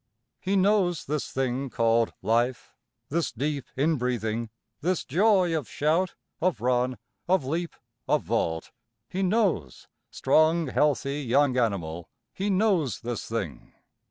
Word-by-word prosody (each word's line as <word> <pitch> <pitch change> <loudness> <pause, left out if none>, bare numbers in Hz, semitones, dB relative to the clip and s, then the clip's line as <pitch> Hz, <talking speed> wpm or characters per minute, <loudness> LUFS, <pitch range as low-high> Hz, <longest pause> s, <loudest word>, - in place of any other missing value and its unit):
He 195 +1 -1
knows 190 -3 +2
this 150 0 -2
thing 130 +1 -1
called 115 -1 +2
Life, 120 +2 0 0.4
this 165 +3 0
deep 140 +2 -2
inbreathing, 120 -6 0 0.3
this 180 +3 -1
joy 185 +1 +3
of 145 -9 -3
shout, 165 +5 +1 0.3
of 180 -5 +1
run, 125 +1 +1 0.3
of 185 -6 +2
leap, 165 +5 -2 0.3
of - - +2
vault. 80 0 -1 0.4
He 190 - -3
knows 185 - 0 0.2
strong 160 -1 +3
healthy 145 0 +1
young 135 +1 +2
animal 85 -9 -1 0.2
he 195 +2 -2
knows 190 - +1
this 120 -2 -4
thing. 105 -10 -5
140 Hz, 125 wpm, -27 LUFS, 120-175 Hz, 0.4 s, joy